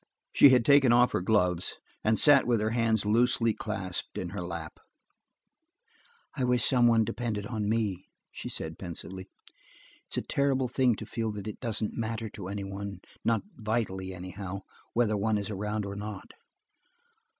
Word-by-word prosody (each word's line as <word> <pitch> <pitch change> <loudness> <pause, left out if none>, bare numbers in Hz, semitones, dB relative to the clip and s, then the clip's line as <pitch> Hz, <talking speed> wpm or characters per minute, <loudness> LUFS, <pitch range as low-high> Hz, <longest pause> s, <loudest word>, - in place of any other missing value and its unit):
She 140 - +8
had 125 -3 +4
taken 140 -3 +6
off 120 +1 +5
her - - 0
gloves, 90 -3 +1 0.3
and 110 0 +3
sat 145 -4 +7
with 120 -2 +3
her 110 +1 0
hands 115 -3 +1
loosely 115 +1 +3
clasped 100 -5 -5
in 90 - -3
her 100 +1 -5
lap. 85 -2 -6 1.6
"I 135 - -1
wish 125 -1 +2
someone 120 -3 +4
depended 110 -3 -3
on 105 -2 -2
me," 105 -5 -1 0.2
she - - -7
said 80 0 -4
pensively. 95 +1 -7 0.8
"It's - - -2
a - - 0
terrible 135 -2 +1
thing 125 -1 +2
to - - -7
feel 115 -1 -3
that 100 -1 -7
it 105 - -6
doesn't 110 -3 -2
matter 115 -1 -3
to 100 -2 -8
anyone–not 100 +2 -3
vitally, 105 -4 -2
anyhow–whether 95 +4 -4
one 105 +1 +1
is 100 +1 -4
around 105 +1 -2
or 100 0 -5
not. 105 -1 -7
110 Hz, 150 wpm, -29 LUFS, 95-115 Hz, 1.6 s, She